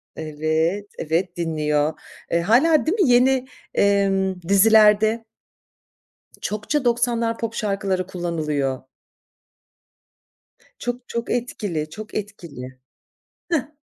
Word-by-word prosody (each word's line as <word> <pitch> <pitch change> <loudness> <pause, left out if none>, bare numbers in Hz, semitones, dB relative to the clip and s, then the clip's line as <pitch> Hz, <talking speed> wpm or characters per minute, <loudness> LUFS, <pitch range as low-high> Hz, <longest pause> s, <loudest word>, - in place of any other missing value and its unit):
evet 160 +5 -1
evet, 170 +3 -1
dinliyor. 155 -2 0 0.4
Eee, 170 0 +2
hâlâ, 280 - +4
değil 390 +7 0
mi, 275 - +4
yeni, 255 +1 +4 0.3
eee, 200 -1 +3 0.4
dizilerde 215 +2 +5 1.2
Çokça 230 +7 -2
90'lar 235 -1 +1
pop 230 0 -3
şarkıları 195 -3 -1
kullanılıyor. 155 -7 -2 2.0
Çok, 245 0 -5
çok 235 0 -3
etkili, 205 -10 -2
çok 215 +7 -9
etkili. 160 - -7 0.7
Hıh. 305 -1 -1
200 Hz, 90 wpm, -22 LUFS, 160-235 Hz, 2.0 s, dizilerde